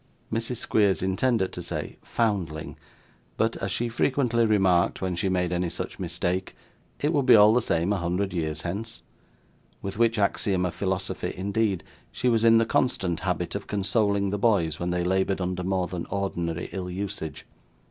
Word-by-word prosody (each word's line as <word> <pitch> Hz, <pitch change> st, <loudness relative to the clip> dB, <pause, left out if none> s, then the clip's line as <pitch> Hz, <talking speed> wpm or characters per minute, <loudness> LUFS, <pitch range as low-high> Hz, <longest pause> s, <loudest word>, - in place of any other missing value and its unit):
'Mrs. 115 Hz, +2 st, -1 dB
Squeers 100 Hz, -4 st, +2 dB
intended 95 Hz, +2 st, +1 dB
to -, -, -5 dB
say -, -, -5 dB
'foundling,' 95 Hz, -9 st, -2 dB, 0.6 s
but, 115 Hz, +1 st, +1 dB
as 95 Hz, -, -3 dB
she 120 Hz, +5 st, 0 dB
frequently 120 Hz, -1 st, +1 dB
remarked 95 Hz, -4 st, +3 dB
when 95 Hz, -1 st, -2 dB
she 95 Hz, +3 st, 0 dB
made 90 Hz, -1 st, 0 dB
any 90 Hz, 0 st, 0 dB
such -, -, -6 dB
mistake, 90 Hz, +2 st, -2 dB, 0.4 s
it 150 Hz, +3 st, +1 dB
would 140 Hz, -4 st, +1 dB
be 125 Hz, -, +9 dB
all 105 Hz, 0 st, +7 dB
the 125 Hz, -, +3 dB
same 85 Hz, -1 st, +1 dB
a -, -, 0 dB
hundred 90 Hz, +2 st, -1 dB
years 80 Hz, -2 st, -2 dB
hence; 110 Hz, +6 st, -5 dB, 0.8 s
with 100 Hz, +2 st, -5 dB
which 115 Hz, 0 st, +3 dB
axiom 100 Hz, -2 st, +1 dB
of 90 Hz, -, -2 dB
philosophy, 95 Hz, 0 st, -2 dB
indeed, 100 Hz, 0 st, 0 dB, 0.3 s
she 125 Hz, -, 0 dB
was 115 Hz, -2 st, +2 dB
in 115 Hz, 0 st, +7 dB
the 115 Hz, -, +4 dB
constant 95 Hz, -8 st, 0 dB
habit -, -, -2 dB
of -, -, -5 dB
consoling 100 Hz, 0 st, +1 dB
the 105 Hz, -, -2 dB
boys 95 Hz, -8 st, +2 dB
when 85 Hz, -, -2 dB
they 90 Hz, 0 st, 0 dB
laboured 95 Hz, +2 st, +1 dB
under 90 Hz, 0 st, -2 dB
more 95 Hz, 0 st, 0 dB
than 90 Hz, -1 st, -5 dB
ordinary 85 Hz, -4 st, -2 dB
ill 90 Hz, -2 st, -4 dB
usage. 95 Hz, -3 st, -5 dB
95 Hz, 175 wpm, -26 LUFS, 90-110 Hz, 0.8 s, be